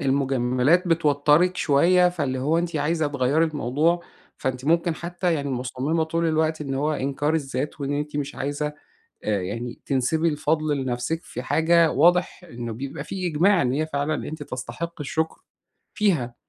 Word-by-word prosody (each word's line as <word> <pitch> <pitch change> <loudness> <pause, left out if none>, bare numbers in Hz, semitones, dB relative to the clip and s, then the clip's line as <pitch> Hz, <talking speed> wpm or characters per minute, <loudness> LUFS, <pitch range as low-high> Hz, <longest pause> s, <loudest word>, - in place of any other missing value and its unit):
المجاملات 135 +4 +2
بتوتَّرِك 155 +2 +3
شوية 175 +4 +4
فاللي 145 -7 -2
هو 150 +6 +1
أنتِ 170 -1 -2
عايزة 155 +2 +1
تغيّري 145 +2 +2
الموضوع، 155 +3 0 0.3
فأنتِ 130 0 -3
ممكن 170 +2 +2
حتى 175 +1 -2
يعني 140 -2 -2
مصمِّمة 130 +5 -1
طول 165 +1 -1
الوقت 160 0 +1
إن 140 -2 -3
هو 150 +3 0
إنكار 145 +2 -1
الذات، 145 -1 -3
وإن 140 0 -2
أنتِ 150 0 -3
مش 145 -1 -3
عايزة 145 +2 -3 0.5
آآ، 105 -3 0
يعني 115 +6 -5
تنسبي 140 +5 +1
الفضل 155 0 0
لنفسِك 130 +5 -2
في - - -7
حاجة 165 0 +3
واضح 175 +4 +3
إنه 120 -8 -6
بيبقى 135 +4 -6
في 185 +2 -4
إجماع 175 +4 +3
إن 125 -1 +1
هي 155 +4 0
فعلًا 145 0 -2
أنتِ 155 0 -6
تستحقّي 140 +6 -6
الشكر 160 +3 -2 0.5
فيها، 155 - +1
150 Hz, 155 wpm, -24 LUFS, 135-165 Hz, 0.5 s, شوية